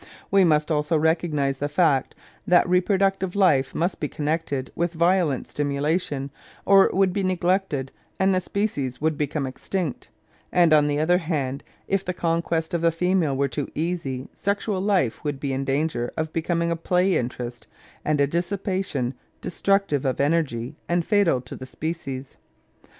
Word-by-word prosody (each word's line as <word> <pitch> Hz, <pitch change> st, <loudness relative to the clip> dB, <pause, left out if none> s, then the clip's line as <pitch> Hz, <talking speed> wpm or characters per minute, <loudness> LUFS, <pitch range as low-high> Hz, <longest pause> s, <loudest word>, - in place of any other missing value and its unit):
" -, -, -23 dB
We 195 Hz, -1 st, +5 dB
must 155 Hz, -2 st, +2 dB
also 150 Hz, +1 st, +1 dB
recognise 150 Hz, -4 st, +1 dB
the 145 Hz, -, -1 dB
fact 145 Hz, -4 st, +2 dB, 0.3 s
that 175 Hz, +1 st, +5 dB
reproductive 190 Hz, +1 st, +1 dB
life 150 Hz, -10 st, +3 dB
must 175 Hz, +3 st, -1 dB
be 150 Hz, -, -1 dB
connected 150 Hz, -3 st, -2 dB
with 170 Hz, 0 st, -1 dB
violent 170 Hz, -4 st, +2 dB
stimulation, 145 Hz, 0 st, -1 dB, 0.3 s
or 195 Hz, -1 st, +7 dB
it -, -, -1 dB
would 190 Hz, -1 st, +3 dB
be 200 Hz, -, 0 dB
neglected 180 Hz, -6 st, 0 dB, 0.3 s
and 190 Hz, 0 st, +3 dB
the 185 Hz, -, +1 dB
species 145 Hz, -, -2 dB
would 155 Hz, +1 st, +1 dB
become 145 Hz, 0 st, -2 dB
extinct; 155 Hz, +4 st, -4 dB, 0.4 s
and 170 Hz, -3 st, +4 dB
on 150 Hz, -1 st, +5 dB
the 145 Hz, 0 st, 0 dB
other 175 Hz, +3 st, +3 dB
hand, 145 Hz, -5 st, -2 dB, 0.2 s
if 195 Hz, -1 st, 0 dB
the 180 Hz, -1 st, -3 dB
conquest 165 Hz, 0 st, -1 dB
of 170 Hz, -, 0 dB
the 165 Hz, 0 st, +4 dB
female 165 Hz, -4 st, +1 dB
were 140 Hz, 0 st, +2 dB
too 140 Hz, +1 st, -3 dB
easy, 155 Hz, -6 st, -2 dB
sexual 200 Hz, 0 st, -1 dB
life 190 Hz, -, +1 dB
would 145 Hz, -3 st, -2 dB
be 140 Hz, -1 st, -2 dB
in 135 Hz, +1 st, -1 dB
danger 135 Hz, -3 st, -1 dB
of 160 Hz, 0 st, -2 dB
becoming 170 Hz, +1 st, 0 dB
a -, -, +1 dB
play 180 Hz, +3 st, +1 dB
interest 120 Hz, -1 st, -4 dB, 0.4 s
and 150 Hz, -1 st, +1 dB
a 140 Hz, -, +5 dB
dissipation, 175 Hz, -5 st, -2 dB, 0.3 s
destructive 195 Hz, -6 st, 0 dB
of 130 Hz, -2 st, -1 dB
energy 140 Hz, -3 st, 0 dB
and 170 Hz, -1 st, +1 dB
fatal 200 Hz, -, +3 dB
to 125 Hz, -, -9 dB
the 130 Hz, -, -9 dB
species. 140 Hz, -4 st, -5 dB
160 Hz, 165 wpm, -24 LUFS, 140-180 Hz, 0.4 s, or